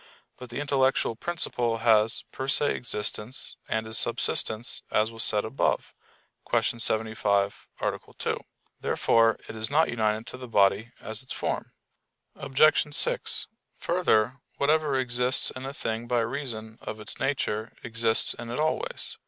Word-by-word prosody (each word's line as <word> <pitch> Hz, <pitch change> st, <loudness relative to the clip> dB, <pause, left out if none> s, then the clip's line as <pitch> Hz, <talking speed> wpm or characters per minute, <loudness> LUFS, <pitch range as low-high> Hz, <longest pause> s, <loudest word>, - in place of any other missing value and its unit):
But 125 Hz, -1 st, -11 dB
the 120 Hz, -, -5 dB
intellectual 135 Hz, -4 st, +1 dB
principle 120 Hz, -6 st, 0 dB
has 110 Hz, -1 st, +3 dB
per 130 Hz, -, -5 dB
se 145 Hz, +1 st, +3 dB
existence 110 Hz, +1 st, -1 dB
and 110 Hz, 0 st, -1 dB
is 110 Hz, -1 st, 0 dB
subsistent, 110 Hz, +2 st, 0 dB
as 110 Hz, +1 st, +1 dB
was 115 Hz, -1 st, -2 dB
said 105 Hz, 0 st, +3 dB
above 110 Hz, +5 st, -1 dB, 0.6 s
(Q. 115 Hz, -, +1 dB
75, 110 Hz, -3 st, +1 dB
A. -, -, -1 dB, 0.2 s
2). -, -, -1 dB, 0.4 s
Therefore 115 Hz, -1 st, +3 dB
it -, -, -8 dB
is 110 Hz, +2 st, -3 dB
not 155 Hz, +3 st, +3 dB
united 110 Hz, -1 st, 0 dB
to -, -, -7 dB
the 125 Hz, -1 st, -8 dB
body 105 Hz, +1 st, +2 dB
as 110 Hz, 0 st, -5 dB
its 130 Hz, -, -6 dB
form. -, -, -3 dB, 0.6 s
Obj. 145 Hz, +2 st, +3 dB
6: -, -, +3 dB, 0.3 s
Further, 130 Hz, -8 st, +1 dB, 0.2 s
whatever 150 Hz, -1 st, +2 dB
exists 125 Hz, 0 st, +2 dB
in 130 Hz, +1 st, -7 dB
a -, -, -4 dB
thing 115 Hz, -4 st, -4 dB
by 120 Hz, -1 st, +2 dB
reason 115 Hz, -3 st, -4 dB
of 110 Hz, -, -6 dB
its 105 Hz, -, -4 dB
nature 115 Hz, -5 st, -1 dB
exists 115 Hz, -1 st, +2 dB
in 120 Hz, 0 st, -8 dB
it 120 Hz, -, -3 dB
always. 475 Hz, -, -2 dB
120 Hz, 145 wpm, -27 LUFS, 110-135 Hz, 0.6 s, has